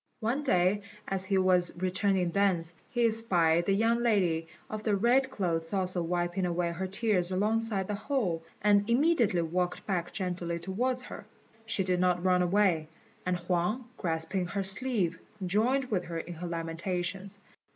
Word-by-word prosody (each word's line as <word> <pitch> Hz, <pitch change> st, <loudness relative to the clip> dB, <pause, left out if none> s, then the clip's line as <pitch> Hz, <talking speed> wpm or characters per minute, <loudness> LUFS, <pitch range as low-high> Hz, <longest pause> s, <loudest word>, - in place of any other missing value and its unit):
One 240 Hz, +5 st, 0 dB
day, 190 Hz, -6 st, +2 dB, 0.3 s
as 190 Hz, -1 st, -1 dB
he 195 Hz, 0 st, +1 dB
was 180 Hz, -2 st, +3 dB
returning 185 Hz, 0 st, +1 dB
thence, 180 Hz, -4 st, +1 dB, 0.2 s
he 240 Hz, -1 st, +1 dB
espied 175 Hz, -7 st, +3 dB
the 195 Hz, -, +3 dB
young 225 Hz, +3 st, +2 dB
lady 180 Hz, -8 st, +2 dB, 0.2 s
of 215 Hz, 0 st, -5 dB
the 215 Hz, -2 st, +2 dB
red 245 Hz, +6 st, +3 dB
clothes 165 Hz, -8 st, -2 dB
also 185 Hz, -2 st, 0 dB
wiping 175 Hz, +2 st, -1 dB
away 170 Hz, 0 st, 0 dB
her 185 Hz, +3 st, -3 dB
tears 195 Hz, -3 st, +1 dB
alongside 210 Hz, 0 st, +1 dB
the 210 Hz, -, -2 dB
hole, 200 Hz, -, -1 dB, 0.2 s
and 205 Hz, +1 st, +4 dB
immediately 240 Hz, -, +3 dB
walked 180 Hz, +2 st, -2 dB
back 180 Hz, -4 st, -2 dB
gently 175 Hz, -3 st, -3 dB
towards 245 Hz, +9 st, -1 dB
her. -, -, -9 dB, 0.4 s
She 220 Hz, -3 st, +1 dB
did 180 Hz, -1 st, +1 dB
not 180 Hz, -1 st, +2 dB
run 180 Hz, -1 st, +4 dB
away, 180 Hz, -3 st, +2 dB, 0.4 s
and 180 Hz, -1 st, +1 dB
Huang, 180 Hz, +8 st, -1 dB
grasping 170 Hz, 0 st, -1 dB
her 195 Hz, +2 st, -2 dB
sleeve, 195 Hz, -4 st, 0 dB, 0.3 s
joined 245 Hz, +8 st, +1 dB
with 185 Hz, -4 st, 0 dB
her 165 Hz, -1 st, -5 dB
in 170 Hz, +1 st, -5 dB
her 175 Hz, +2 st, -6 dB
lamentations. 175 Hz, +4 st, -3 dB
185 Hz, 160 wpm, -30 LUFS, 175-215 Hz, 0.4 s, and